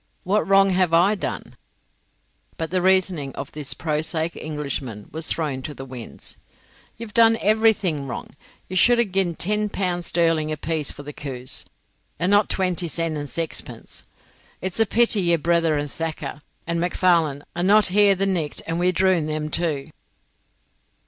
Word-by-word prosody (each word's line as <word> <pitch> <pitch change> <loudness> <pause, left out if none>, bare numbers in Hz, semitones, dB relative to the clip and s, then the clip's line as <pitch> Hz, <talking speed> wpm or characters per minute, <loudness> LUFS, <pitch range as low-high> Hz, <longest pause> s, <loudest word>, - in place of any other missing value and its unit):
What 205 +2 +1
wrong 195 0 +5
have 180 -2 +2
I 180 +5 +5
done?" 210 - -5 1.0
But 160 0 -3
the 185 -1 +1
reasoning 185 -6 +2
of 140 - -6
the 150 - -7
prosaic 160 +1 -1
Englishman 140 -8 -5
was 160 +1 -4
thrown 145 -5 -1
to 150 +2 -7
the 135 - -8
winds: 125 -3 -8 0.6
"Ye've 225 -2 -8
done 225 -1 +6
everything 210 -9 +2
wrong. 125 - -6 0.4
Ye 185 - -6
should 240 +6 +5
hae 235 - +4
gin 190 -3 0
ten 210 +4 0
pund 180 -3 -2
sterling 165 -2 +1
apiece 155 0 -2
for 145 - -6
the 150 +1 -8
coos, 130 -3 -5 0.5
and 180 +5 +1
not 205 0 +4
twenty 180 -2 0
sen 165 -1 -2
and 145 -1 -5
saxpence. 165 +1 -5 0.5
It's 185 +2 -3
a 225 - +4
pity 230 -2 +3
yer 170 -2 +3
brither, 165 -1 +2
and 145 -1 -3
Thacker, 160 -2 -5 0.2
and 170 0 -1
MacFarlane 170 -5 +2
are 175 - -2
no 205 +4 +5
here 200 0 +4
the 195 +1 0
nicht, 170 -7 -2
and 165 +1 -2
we'd 180 0 +2
droon 185 -4 +2
them, 155 0 -3
too." 155 -5 -1
170 Hz, 160 wpm, -23 LUFS, 150-190 Hz, 1.0 s, done